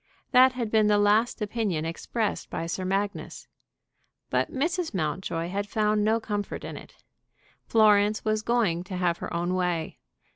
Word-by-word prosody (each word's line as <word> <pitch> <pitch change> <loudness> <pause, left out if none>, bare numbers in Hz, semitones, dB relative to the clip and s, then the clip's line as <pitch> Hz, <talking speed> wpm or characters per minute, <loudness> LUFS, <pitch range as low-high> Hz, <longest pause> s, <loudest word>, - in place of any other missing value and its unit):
That 255 +1 +6
had 235 -4 -3
been 215 -1 +4
the 210 0 +4
last 210 +3 +2
opinion 205 -7 -2
expressed 210 +6 -3
by 165 - -4
Sir 170 +3 -3
Magnus. 195 +2 -3 0.8
But - - 0
Mrs. 325 - -1
Mountjoy 165 +1 -2
had 200 +2 -3
found 210 0 +1
no 220 +2 +2
comfort 205 -2 -4
in - - -6
it. - - -12 0.7
Florence 210 -1 +4
was 215 0 +1
going 215 -7 +1
to 185 -1 -5
have 175 -2 0
her - - -6
own 175 +2 -1
way. 180 -3 -2
205 Hz, 155 wpm, -27 LUFS, 180-220 Hz, 0.8 s, That